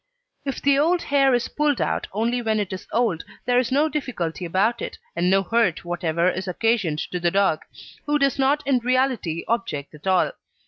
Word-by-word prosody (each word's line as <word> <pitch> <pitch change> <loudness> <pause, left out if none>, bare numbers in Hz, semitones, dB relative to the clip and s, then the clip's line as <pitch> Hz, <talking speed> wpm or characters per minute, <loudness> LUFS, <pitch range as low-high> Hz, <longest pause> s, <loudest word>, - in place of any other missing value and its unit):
If 275 - -4
the 280 0 +4
old 340 +4 +2
hair 275 -2 +3
is 240 - -1
pulled 295 -3 0
out - - -1
only 235 +4 0
when 220 -2 0
it 200 -2 -3
is 185 - -7
old, 225 -9 +1 0.2
there 245 0 +3
is 250 -1 -1
no 290 +4 +3
difficulty 210 - -3
about 205 +7 +1
it, - - -5 0.2
and 175 +1 +1
no 195 +1 +3
hurt 220 -5 +1
whatever 170 0 0
is 185 +1 -1
occasioned 200 -4 +1
to 180 - -2
the 175 0 +2
dog, 195 -4 +2 0.5
who 295 0 +3
does 275 -2 +1
not 285 +2 +2
in 270 -2 +3
reality 250 -9 0
object 225 -13 -2
at 150 +5 -11
all. 190 - +3
230 Hz, 195 wpm, -23 LUFS, 180-265 Hz, 0.5 s, the